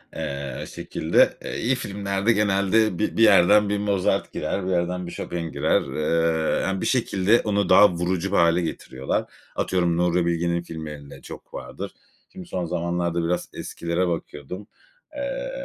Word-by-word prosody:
Eee, 70 Hz, -2 st, -4 dB
şekilde, 80 Hz, +2 st, +2 dB, 0.2 s
iyi 130 Hz, +3 st, +1 dB
filmlerde 100 Hz, -2 st, -1 dB
genelde 100 Hz, -1 st, +2 dB
bir 105 Hz, -, -1 dB
bir 115 Hz, -, +5 dB
yerden 105 Hz, 0 st, +6 dB
bir 105 Hz, -, +1 dB
Mozart 100 Hz, -2 st, 0 dB
girer, 95 Hz, -, -2 dB
bir 95 Hz, -, -1 dB
yerden 90 Hz, 0 st, -1 dB
bir -, -, -7 dB
Chopin 85 Hz, -2 st, -5 dB
girer. -, -, +2 dB
Eee, 80 Hz, +1 st, +1 dB
yani, 95 Hz, 0 st, -1 dB
bir -, -, -1 dB
şekilde 110 Hz, -3 st, +2 dB
onu 100 Hz, -3 st, 0 dB
daha 105 Hz, +3 st, +8 dB
vurucu 90 Hz, +2 st, -1 dB
bir 100 Hz, -, +2 dB
hâle 85 Hz, +1 st, +4 dB
getiriyorlar. 65 Hz, -5 st, -3 dB, 0.3 s
Atıyorum, 85 Hz, -2 st, +1 dB
Nuri 90 Hz, 0 st, +2 dB
Bilge'nin 85 Hz, 0 st, 0 dB
filmlerinde 80 Hz, -4 st, -8 dB
çok -, -, -11 dB
vardır. 65 Hz, -, -7 dB, 0.4 s
Şimdi, 90 Hz, -2 st, -9 dB
son 90 Hz, -2 st, -3 dB
zamanlarda 85 Hz, 0 st, -1 dB
biraz 85 Hz, +1 st, -1 dB
eskilere 85 Hz, +2 st, -2 dB
bakıyordum. 85 Hz, +3 st, -5 dB, 0.5 s
Eee, -, -, -3 dB
90 Hz, 150 wpm, -24 LUFS, 85-100 Hz, 0.5 s, daha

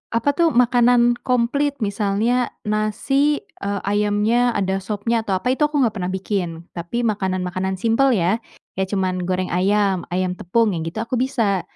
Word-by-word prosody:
apa 230 Hz, +5 st, +2 dB
tuh, 335 Hz, +3 st, +2 dB
makanan 240 Hz, 0 st, +4 dB
komplit 265 Hz, +4 st, 0 dB
misalnya 215 Hz, +4 st, 0 dB, 0.2 s
nasi, 215 Hz, +8 st, +1 dB, 0.2 s
eee, 200 Hz, 0 st, -2 dB
ayamnya 210 Hz, +4 st, +1 dB
ada 190 Hz, -1 st, 0 dB
sopnya 215 Hz, +3 st, -1 dB
atau 195 Hz, -, 0 dB
apa 250 Hz, +6 st, -1 dB
itu 265 Hz, -, -7 dB
aku 300 Hz, 0 st, -3 dB
enggak 225 Hz, -3 st, 0 dB
pernah 180 Hz, -, -2 dB
bikin, 185 Hz, -4 st, -3 dB
tapi 175 Hz, +8 st, -3 dB
makanan-makanan 190 Hz, -2 st, -1 dB
simpel 230 Hz, +7 st, +2 dB
ya, 190 Hz, +4 st, +1 dB, 0.3 s
kayak 190 Hz, 0 st, -2 dB
cuman 185 Hz, -1 st, -1 dB
goreng 185 Hz, 0 st, -1 dB
ayam, 195 Hz, 0 st, +1 dB
ayam 185 Hz, 0 st, 0 dB
tepung 210 Hz, +5 st, +1 dB
yang 165 Hz, -, -3 dB
gitu, 220 Hz, +7 st, -3 dB
aku 235 Hz, +1 st, -2 dB
bisa. 230 Hz, -8 st, +1 dB
210 Hz, 160 wpm, -21 LUFS, 190-240 Hz, 0.3 s, makanan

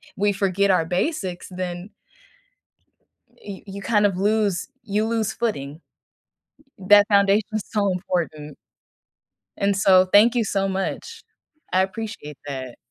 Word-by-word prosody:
we 205 Hz, +1 st, +1 dB
forget 200 Hz, 0 st, +1 dB
our 165 Hz, -3 st, +2 dB
basics, 185 Hz, -, -2 dB
then 180 Hz, +1 st, -6 dB, 1.5 s
y 195 Hz, -2 st, -9 dB
you 200 Hz, 0 st, -8 dB
kind 210 Hz, -2 st, +3 dB
of 195 Hz, -3 st, -1 dB
lose 205 Hz, -2 st, 0 dB
you 215 Hz, 0 st, -1 dB
lose 225 Hz, -2 st, -1 dB
footing. 155 Hz, -10 st, -3 dB, 1.0 s
That 205 Hz, +2 st, +6 dB
foundation 200 Hz, +1 st, +3 dB
is 215 Hz, -, -2 dB
so 205 Hz, -2 st, 0 dB
important. 165 Hz, -5 st, -3 dB, 1.0 s
And 200 Hz, -1 st, +1 dB
so, 185 Hz, -1 st, +5 dB
thank 230 Hz, +4 st, +6 dB
you 235 Hz, -2 st, +1 dB
so 195 Hz, -1 st, -1 dB
much, 195 Hz, -, -4 dB, 0.5 s
I 185 Hz, +1 st, +4 dB
appreciate 190 Hz, -7 st, -6 dB
that. 130 Hz, -3 st, -6 dB
195 Hz, 125 wpm, -23 LUFS, 180-210 Hz, 1.5 s, That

